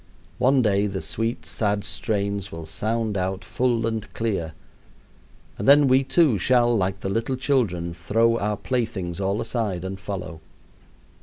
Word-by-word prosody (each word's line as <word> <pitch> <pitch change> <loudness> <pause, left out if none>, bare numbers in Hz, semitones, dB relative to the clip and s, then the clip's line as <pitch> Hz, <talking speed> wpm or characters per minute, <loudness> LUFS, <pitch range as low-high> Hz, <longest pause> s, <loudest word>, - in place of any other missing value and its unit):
One 130 0 +4
day 100 -1 +2
the 95 -1 -3
sweet, 115 +4 -3
sad 105 -2 -1
strains 100 -1 -2
will 80 -1 -7
sound 110 +6 -1
out 95 0 -2
full 120 -1 0
and 110 -2 -3
clear, 95 -9 -2 1.1
and 100 - -2
then 145 0 +7
we 130 +1 +4
too 135 - +3
shall, 120 +3 +3
like 95 -1 -1
the - - -3
little 115 +5 -1
children, 110 -11 0
throw 115 +7 +1
our 105 0 -1
playthings 110 -9 -2
all 100 +2 0
aside 105 -6 -2
and 95 0 -5
follow. 90 -4 -6
105 Hz, 150 wpm, -24 LUFS, 95-115 Hz, 1.1 s, then